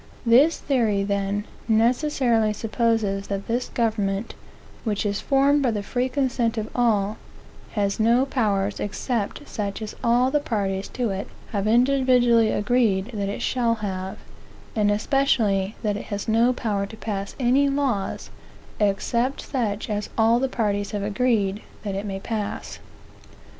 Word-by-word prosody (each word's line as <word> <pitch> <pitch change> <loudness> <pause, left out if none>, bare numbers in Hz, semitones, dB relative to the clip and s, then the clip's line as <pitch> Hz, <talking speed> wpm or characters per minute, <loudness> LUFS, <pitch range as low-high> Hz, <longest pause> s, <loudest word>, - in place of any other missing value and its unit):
This 260 +8 +5
theory, 225 -8 +1
then, 200 +1 -1 0.2
necessarily 235 -1 +2
supposes 215 -3 0
that 200 0 -4
this 240 +2 -1
government, 215 -2 -1 0.5
which 215 -2 -1
is 200 0 -1
formed 280 +1 +3
by 260 - +2
the 210 -3 -2
free 250 +5 -1
consent 250 -3 0
of 215 0 -2
all, 215 -3 +2 0.6
has 200 -1 0
no 235 +4 +4
powers 205 -7 0
except 230 +5 -3
such 200 -3 -4
as 215 -1 -6
all 245 +2 +3
the 295 - +3
parties 200 -8 -2
to 240 -4 -2
it 195 +1 -4 0.2
have 205 -1 -1
individually 245 -1 +4
agreed 210 -2 +1
that 200 -2 -2
it 200 - -4
shall 235 -2 +1
have: 190 -3 -4 0.6
and 210 -2 +2
especially 210 -4 +1
that 210 -2 0
it - - -7
has 205 -1 -4
no 230 +3 +4
power 210 -5 -2
to 220 +2 -11
pass 200 -3 -4
any 265 +3 +3
laws, 270 -8 -1 0.5
except 235 +6 0
such 220 -7 -2
as 210 -1 -3
all 225 +1 +4
the 265 +1 0
parties 205 -4 -1
have 205 -1 -2
agreed 210 -2 +1 0.2
that 200 -2 -3
it 200 +2 -3
may 195 -1 -4
pass. 210 0 -4
220 Hz, 150 wpm, -24 LUFS, 200-245 Hz, 0.6 s, This